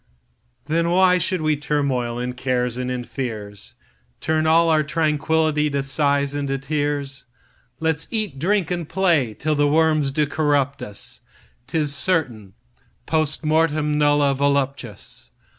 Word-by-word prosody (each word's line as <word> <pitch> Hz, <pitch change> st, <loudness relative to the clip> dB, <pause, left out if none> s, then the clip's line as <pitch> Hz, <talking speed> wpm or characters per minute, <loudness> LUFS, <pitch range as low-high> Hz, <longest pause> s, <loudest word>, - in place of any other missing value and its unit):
Then 165 Hz, +3 st, 0 dB
why 180 Hz, +1 st, +4 dB
should 180 Hz, -1 st, -1 dB
we 155 Hz, -1 st, +2 dB
turmoil 140 Hz, -5 st, -1 dB
in 125 Hz, +1 st, -3 dB
cares 125 Hz, -1 st, -1 dB
and 125 Hz, 0 st, -3 dB
in 125 Hz, -1 st, -3 dB
fears, 110 Hz, -6 st, -6 dB, 0.4 s
Turn 160 Hz, 0 st, 0 dB
all 165 Hz, +1 st, +5 dB
our 155 Hz, -1 st, +3 dB
tranquill'ty 155 Hz, 0 st, +1 dB
to 140 Hz, -1 st, 0 dB
sighs 140 Hz, 0 st, +1 dB
and 145 Hz, -1 st, -2 dB
to 135 Hz, 0 st, -1 dB
tears? 140 Hz, -1 st, -3 dB, 0.5 s
Let's 160 Hz, -1 st, -1 dB
eat, 215 Hz, -, -3 dB
drink, 190 Hz, +3 st, +1 dB
and 175 Hz, -3 st, -3 dB
play 165 Hz, -, +1 dB
till 155 Hz, +1 st, -1 dB
the 145 Hz, 0 st, +2 dB
worms 155 Hz, -1 st, +3 dB
do 150 Hz, +2 st, +1 dB
corrupt 145 Hz, -2 st, 0 dB
us,'Tis 140 Hz, +7 st, -5 dB
certain, 125 Hz, -, 0 dB, 0.5 s
Post 155 Hz, -2 st, +1 dB
mortemNulla 150 Hz, -2 st, +2 dB
voluptas. 140 Hz, -6 st, -2 dB
145 Hz, 130 wpm, -22 LUFS, 135-160 Hz, 0.5 s, all